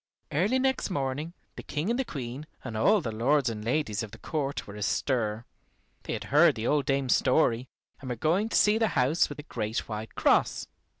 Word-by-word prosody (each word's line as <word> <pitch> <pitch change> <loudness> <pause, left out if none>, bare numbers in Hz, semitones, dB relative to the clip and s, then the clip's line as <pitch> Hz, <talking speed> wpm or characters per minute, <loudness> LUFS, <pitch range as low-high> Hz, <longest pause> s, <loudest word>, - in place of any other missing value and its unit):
Early 195 - +2
next 265 -3 0
morning 145 0 -2 0.2
the - - -7
King 155 +9 -2
and 255 +2 -1
Queen 135 +2 -6 0.2
and 115 -4 -6
all 200 - +4
the 115 - -3
lords 130 +4 +2
and 105 -1 -6
ladies 115 -3 0
of 110 - -5
the 115 - -12
court 140 +1 -3
were 100 - -10
astir. 110 +1 -1 0.6
They - - -3
had - - -4
heard 150 -1 +6
the 110 -1 -4
old 145 +1 +1
dame's 135 -2 +2
story, 125 -1 +2 0.3
and 130 - -8
were 125 - -1
going 170 - +1
to - - +1
see 210 +1 +4
the 225 - +3
house 135 +6 +3
with 145 - -7
the 145 - -7
great 110 -6 -3
white 110 0 -6
cross. - - +2
135 Hz, 200 wpm, -28 LUFS, 115-155 Hz, 0.6 s, heard